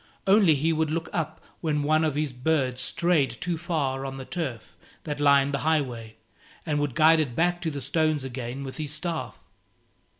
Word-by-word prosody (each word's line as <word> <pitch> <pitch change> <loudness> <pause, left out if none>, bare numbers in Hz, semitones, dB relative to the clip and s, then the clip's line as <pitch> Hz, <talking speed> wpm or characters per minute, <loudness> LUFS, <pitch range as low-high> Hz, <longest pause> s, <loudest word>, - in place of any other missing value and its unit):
Only 195 -5 +5
he 160 +4 +1
would 160 -1 0
look 165 +1 -2
up 160 -1 -2 0.2
when 150 -3 0
one 155 +2 +3
of 155 -3 0
his 150 -2 -1
birds 130 -1 0
strayed 135 -4 +1
too 175 -1 -1
far 150 -6 -2
on 135 0 -5
the 130 - -7
turf 140 -10 -5 0.3
that 150 -2 -4
lined 140 -1 +4
the 140 - 0
highway, 125 -8 -1 0.5
and 150 -3 0
would 145 -4 -1
guide 160 +1 +6
it 135 -6 -1
back 175 +3 +1
to 165 - -1
the 145 -2 -5
stones 155 +2 +1
again 130 0 -5
with 135 -1 -6
his 150 -2 -4
staff. 165 +1 -3
150 Hz, 190 wpm, -26 LUFS, 135-160 Hz, 0.5 s, guide